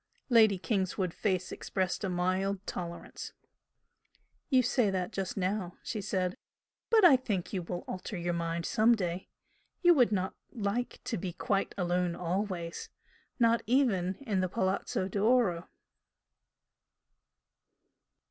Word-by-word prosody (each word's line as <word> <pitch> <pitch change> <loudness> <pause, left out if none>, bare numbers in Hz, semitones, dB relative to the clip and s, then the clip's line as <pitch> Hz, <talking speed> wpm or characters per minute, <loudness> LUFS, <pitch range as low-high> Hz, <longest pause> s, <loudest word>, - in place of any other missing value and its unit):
Lady 220 -5 +6
Kingswood's 185 -2 -1
face 185 -3 -1
expressed 185 +1 -2
a 195 - 0
mild 185 +2 0
tolerance. 170 -1 -6 1.2
"You 260 -2 +5
say 235 -2 +2
that 185 -2 -2
just 195 0 -3
now" 185 -1 -2
she 215 - -3
said 185 -2 -1 0.5
"But 440 -4 +6
I 285 - +9
think 210 -9 -2
you 190 - -1
will 175 +1 -5
alter 185 +1 -5
your 175 0 -1
mind 170 0 -2
some 225 +2 +4
day! 180 -3 -3 0.5
You 350 0 +8
would 250 -8 +4
not 190 -2 0 0.2
like 230 +1 -3
to 225 - -3
be 180 0 -4
quite 195 +2 -1
alone 180 -1 0
always 180 -1 -3 0.5
not 230 -2 +4
even 215 -8 +2
in 205 -6 0
the 185 -1 0
Palazzo 190 0 -1
d'Oro." 200 -3 +2
190 Hz, 130 wpm, -31 LUFS, 180-220 Hz, 1.2 s, I